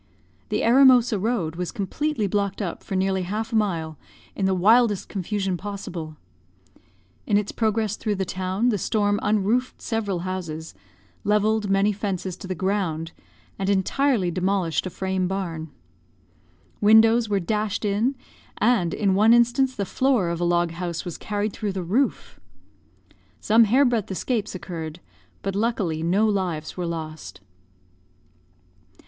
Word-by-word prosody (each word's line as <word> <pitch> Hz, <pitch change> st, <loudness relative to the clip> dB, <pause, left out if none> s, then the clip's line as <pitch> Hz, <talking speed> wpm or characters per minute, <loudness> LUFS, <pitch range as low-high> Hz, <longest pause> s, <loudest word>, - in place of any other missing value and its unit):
"The -, -, 0 dB
Eremosa 250 Hz, -3 st, +5 dB
road 190 Hz, -8 st, -1 dB
was 180 Hz, -1 st, -3 dB
completely 230 Hz, +5 st, -2 dB
blocked 200 Hz, 0 st, -1 dB
up 185 Hz, -6 st, -4 dB
for 195 Hz, -, -4 dB
nearly 190 Hz, 0 st, +1 dB
half 215 Hz, +5 st, -3 dB
a -, -, +1 dB
mile, 165 Hz, -8 st, -1 dB, 0.4 s
in 195 Hz, -, 0 dB
the 190 Hz, -, +2 dB
wildest 210 Hz, +2 st, +4 dB
confusion 195 Hz, -1 st, -2 dB
possible. 175 Hz, -6 st, -6 dB, 1.1 s
In 205 Hz, -, +3 dB
its 205 Hz, -1 st, -1 dB
progress 220 Hz, -2 st, 0 dB
through 210 Hz, -2 st, -1 dB
the 190 Hz, 0 st, -2 dB
town 185 Hz, +6 st, -1 dB
the 210 Hz, -4 st, 0 dB
storm 205 Hz, +1 st, +1 dB
unroofed 215 Hz, +5 st, 0 dB
several 205 Hz, -6 st, -2 dB
houses, 170 Hz, -3 st, -5 dB, 0.5 s
levelled 210 Hz, 0 st, +1 dB
many 195 Hz, +2 st, +3 dB
fences 190 Hz, -3 st, -3 dB
to -, -, -9 dB
the 185 Hz, -, -3 dB
ground, 170 Hz, -3 st, -1 dB, 0.5 s
and 195 Hz, 0 st, -1 dB
entirely 200 Hz, +1 st, +1 dB
demolished 185 Hz, -1 st, 0 dB
a -, -, -3 dB
frame 190 Hz, 0 st, -2 dB
barn. 170 Hz, -4 st, -4 dB, 1.1 s
Windows 220 Hz, +2 st, +5 dB
were 200 Hz, -1 st, +2 dB
dashed 210 Hz, +3 st, -2 dB
in; 215 Hz, +7 st, +1 dB, 0.4 s
and, 210 Hz, -7 st, +2 dB
in 200 Hz, -3 st, +1 dB
one 215 Hz, +4 st, +5 dB
instance, 245 Hz, +2 st, +2 dB
the 200 Hz, -, -2 dB
floor 250 Hz, -4 st, +1 dB
of 170 Hz, 0 st, -3 dB
a -, -, +1 dB
log 175 Hz, -1 st, +2 dB
house 170 Hz, 0 st, -4 dB
was 175 Hz, -, -5 dB
carried 205 Hz, 0 st, -2 dB
through 210 Hz, -3 st, -3 dB
the 185 Hz, -1 st, -3 dB
roof. 230 Hz, +11 st, -1 dB, 1.0 s
Some 225 Hz, +2 st, +5 dB
hair 255 Hz, +7 st, +4 dB
breadth 235 Hz, -5 st, 0 dB
escapes 210 Hz, +1 st, -2 dB
occurred; 165 Hz, -3 st, -6 dB, 0.4 s
but, 195 Hz, -, -2 dB
luckily, 200 Hz, -7 st, -1 dB
no 185 Hz, +6 st, +2 dB
lives 185 Hz, -7 st, -1 dB
were 180 Hz, -2 st, -3 dB
lost. 155 Hz, -, -6 dB
200 Hz, 145 wpm, -24 LUFS, 180-220 Hz, 1.1 s, Eremosa